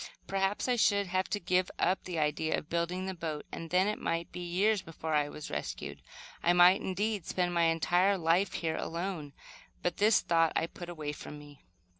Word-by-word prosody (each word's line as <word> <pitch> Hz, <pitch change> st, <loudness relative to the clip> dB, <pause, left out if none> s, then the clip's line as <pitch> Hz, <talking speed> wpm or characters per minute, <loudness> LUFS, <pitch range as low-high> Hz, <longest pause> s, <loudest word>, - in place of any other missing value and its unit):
Perhaps 195 Hz, +3 st, 0 dB
I 250 Hz, -1 st, +2 dB
should 200 Hz, -3 st, +3 dB
have 185 Hz, +1 st, -1 dB
to 205 Hz, -, -1 dB
give 180 Hz, 0 st, +1 dB
up 185 Hz, +1 st, +1 dB
the 180 Hz, -2 st, -4 dB
idea 155 Hz, +1 st, +1 dB
of 150 Hz, -, -8 dB
building 170 Hz, +2 st, -1 dB
the 190 Hz, -, -3 dB
boat, 160 Hz, -4 st, -5 dB
and 165 Hz, -, -6 dB
then 185 Hz, +3 st, +3 dB
it 210 Hz, -, -1 dB
might 165 Hz, 0 st, -2 dB
be -, -, -7 dB
years 190 Hz, +4 st, +1 dB
before 160 Hz, -2 st, -5 dB
I 145 Hz, -1 st, +2 dB
was 150 Hz, -, -8 dB
rescued. 70 Hz, -1 st, -5 dB, 0.4 s
I 175 Hz, -, +4 dB
might, 180 Hz, +2 st, +6 dB
indeed, 200 Hz, 0 st, -2 dB
spend 180 Hz, -1 st, 0 dB
my 170 Hz, -1 st, +3 dB
entire 175 Hz, +4 st, +3 dB
life 175 Hz, +3 st, +2 dB
here 160 Hz, -1 st, -2 dB
alone; 170 Hz, -4 st, -4 dB, 0.5 s
but 175 Hz, -, -1 dB
this 210 Hz, +1 st, +5 dB
thought 165 Hz, -1 st, +2 dB
I -, -, +2 dB
put 175 Hz, +1 st, -9 dB
away 155 Hz, -4 st, -4 dB
from 150 Hz, 0 st, -9 dB
me. 145 Hz, -1 st, -14 dB
175 Hz, 200 wpm, -31 LUFS, 160-190 Hz, 0.5 s, might